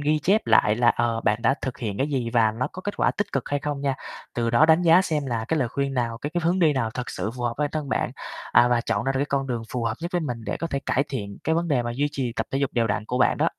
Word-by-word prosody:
ghi 150 +1 +2
chép 200 +7 +2
lại 105 +1 +4
là, 120 0 +3
ờ, 115 -1 +1
bạn 105 +2 0
đã 130 - +4
thực 130 -2 -4
hiện 105 -5 -4
cái 135 - +1
gì 130 -5 -1
và 115 -3 +4
nó 125 +3 -2
có 185 - -8
kết 205 - -4
quả - - +3
tích 205 0 -3
cực 135 - -2
hay 145 0 -1
không 145 0 -3
nha. 140 -1 0 0.4
Từ 115 -1 0
đó 120 +7 +5
đánh 160 +2 +5
giá 170 +2 +6
xem 150 -6 -1
là 115 -3 -2
cái 160 - +1
lời 130 -5 +1
khuyên 140 +2 -2
nào, 115 -2 -1
cái 145 +5 -4
cái 175 - +1
hướng 175 +3 +2
đi 160 -4 +4
nào 120 -5 -1
thực 125 +2 -5
sự 100 +4 -3
phù 125 - -5
hợp 120 -1 -1
bản 150 -1 +1
thân 155 -3 -3
bạn, - - 0 0.4
à, 120 - +6
và 120 -1 +2
chọn 115 -3 -1
ra 135 - +1
được 135 - -1
cái - - +2
con 140 -2 -1
đường 120 -3 -2
phù 125 - -2
hợp 110 - 0
nhất 170 +2 -4
với 175 - +1
mình 120 -7 -4
để 105 - -2
có 165 - -3
thể 140 -4 -2
cải 135 - +2
thiện 100 -7 -5
cái 160 - +2
vấn 170 +1 0
đề 135 -5 +2
mà 120 0 -3
duy 145 +3 +1
trì 125 -4 -2
tập - - -3
thể 135 - -1
dục 140 -2 0
đều 115 -1 +1
đặn 105 0 -1
của 125 +3 -2
bạn - - +3
đó. - - +3
130 Hz, 330 wpm, -24 LUFS, 115-150 Hz, 0.4 s, giá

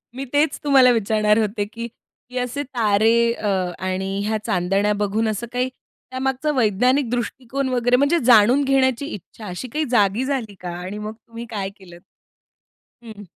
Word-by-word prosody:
मी 270 +1 -4
तेच 295 +2 +2
तुम्हाला 270 -4 +6
विचारणार 215 -1 +2
होते 210 -1 -1
की, 230 +2 -7 0.4
की 250 - -7
असे 250 +3 -2
तारे 230 -2 +2
अ, 215 -3 -4 0.3
आणि 190 +1 -2
ह्या 220 +1 0
चांदण्या 195 +1 +1
बघून 210 +2 0
असं 220 +2 -3
काही 250 +1 0 0.4
त्यामागचा 265 +3 -1
वैज्ञानिक 250 +2 +2
दृष्टिकोन 255 +2 -3
वगैरे 245 0 +2
म्हणजे 285 +5 +3
जाणून 240 +3 +6
घेण्याची 265 -1 +2
इच्छा 210 +3 -10
अशी 180 +8 -6
काही 310 0 0
जागी 215 0 +2
झाली 255 -7 -3
का? 180 - -6
आणि 185 +4 -6
मग 210 +1 -5
तुम्ही 230 +1 -10
काय 200 -4 -3
केलत? 175 -2 -14 1.0
हं. 215 -3 -10
230 Hz, 155 wpm, -21 LUFS, 205-255 Hz, 1.0 s, तुम्हाला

